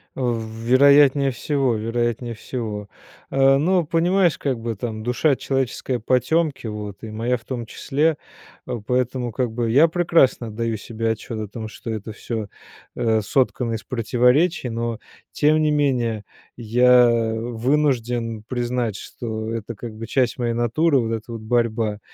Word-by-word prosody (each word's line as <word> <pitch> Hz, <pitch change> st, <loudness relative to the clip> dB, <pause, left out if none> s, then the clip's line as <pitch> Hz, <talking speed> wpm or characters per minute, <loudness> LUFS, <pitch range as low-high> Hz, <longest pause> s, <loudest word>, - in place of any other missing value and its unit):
Э, -, -, -8 dB
в 120 Hz, -3 st, 0 dB
вероятнее 135 Hz, +4 st, +4 dB
всего, 135 Hz, -1 st, 0 dB
вероятнее 120 Hz, +2 st, -2 dB
всего. 110 Hz, -3 st, -5 dB, 0.4 s
А, 135 Hz, 0 st, +4 dB
ну 175 Hz, +3 st, +2 dB
понимаешь, 175 Hz, +2 st, +2 dB
как 130 Hz, -4 st, -2 dB
бы 115 Hz, 0 st, -3 dB
там 110 Hz, 0 st, -5 dB
душа 130 Hz, +4 st, +2 dB
человеческая 130 Hz, -2 st, -2 dB
потемки, 140 Hz, +5 st, +1 dB
вот, 105 Hz, -1 st, -7 dB
и 110 Hz, -, -6 dB
моя 120 Hz, +3 st, -1 dB
в 115 Hz, -, -21 dB
том 120 Hz, -2 st, -4 dB
числе. 150 Hz, +6 st, 0 dB, 0.5 s
А, 120 Hz, -, -4 dB
поэтому 125 Hz, +2 st, -1 dB
как 125 Hz, 0 st, -1 dB
бы 115 Hz, 0 st, -1 dB
я 145 Hz, +7 st, +6 dB
прекрасно 165 Hz, -8 st, +2 dB
отдаю 115 Hz, +1 st, -2 dB
себе 115 Hz, +1 st, -3 dB
отчет 110 Hz, +1 st, -5 dB
о 105 Hz, -, -4 dB
том 110 Hz, +2 st, -7 dB
что 115 Hz, +1 st, -7 dB
это 110 Hz, 0 st, -5 dB
всё, 110 Hz, 0 st, -5 dB, 0.5 s
э, 110 Hz, -1 st, +1 dB
соткано 120 Hz, +1 st, 0 dB
из 110 Hz, -, -4 dB
противоречий. 125 Hz, +6 st, +2 dB
Но, 115 Hz, 0 st, -3 dB, 0.3 s
тем 155 Hz, +1 st, +3 dB
не 155 Hz, -, +2 dB
менее 125 Hz, -7 st, 0 dB, 0.3 s
я 125 Hz, +1 st, +5 dB, 0.3 s
вынужден 120 Hz, -2 st, -1 dB
признать, 120 Hz, -3 st, -2 dB
что 110 Hz, +1 st, -5 dB
это 115 Hz, +1 st, -5 dB
как 110 Hz, +1 st, -8 dB
бы 115 Hz, +1 st, -7 dB
часть 130 Hz, -2 st, +1 dB
моей 120 Hz, -1 st, 0 dB
натуры, 135 Hz, +6 st, +2 dB
вот 115 Hz, -1 st, -1 dB
эта 115 Hz, +1 st, -5 dB
вот 115 Hz, -1 st, -6 dB
борьба, 110 Hz, -2 st, 0 dB
120 Hz, 155 wpm, -22 LUFS, 115-135 Hz, 0.5 s, я